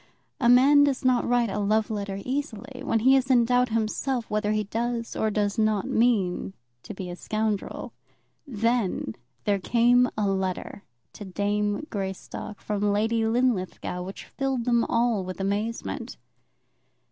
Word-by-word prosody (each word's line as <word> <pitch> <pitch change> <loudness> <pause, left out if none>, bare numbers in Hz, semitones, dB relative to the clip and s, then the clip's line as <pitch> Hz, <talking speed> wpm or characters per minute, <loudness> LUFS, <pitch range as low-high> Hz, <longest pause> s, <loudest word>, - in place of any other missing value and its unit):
A 235 - +3
man 275 +4 +7
does 275 -2 0
not 255 -1 +3
write 240 -3 +2
a 210 - -2
love 215 +2 +1
letter 200 -2 -3
easily 260 -2 -4
when 225 -5 +1
he 265 +3 +6
is 265 -1 +1
in 245 -3 +5
doubt 250 +1 +2
himself 230 +3 -1
whether 210 0 0
he 215 0 +1
does 230 +3 -3
or 220 - +1
does 205 +1 -1
not 215 -3 +1
mean 200 -6 +1 0.3
to - - -9
be 185 -2 -6
a - - -6
scoundrel. 215 +1 -3 0.5
Then 230 - 0 0.3
there 200 -1 +1
came 245 +4 +4
a 210 -2 +1
letter 190 0 -2 0.3
to - - -9
"Dame" 205 +5 -1
Greystock 195 0 -5
from 205 -1 0
Lady 225 +2 +1
Linlithgow, 220 -7 0
which 190 +2 -7
filled 270 -4 -2
them 235 -2 +3
all 230 -4 +1
with 185 +1 -7
amazement. 205 +4 -3
220 Hz, 150 wpm, -26 LUFS, 205-245 Hz, 0.5 s, man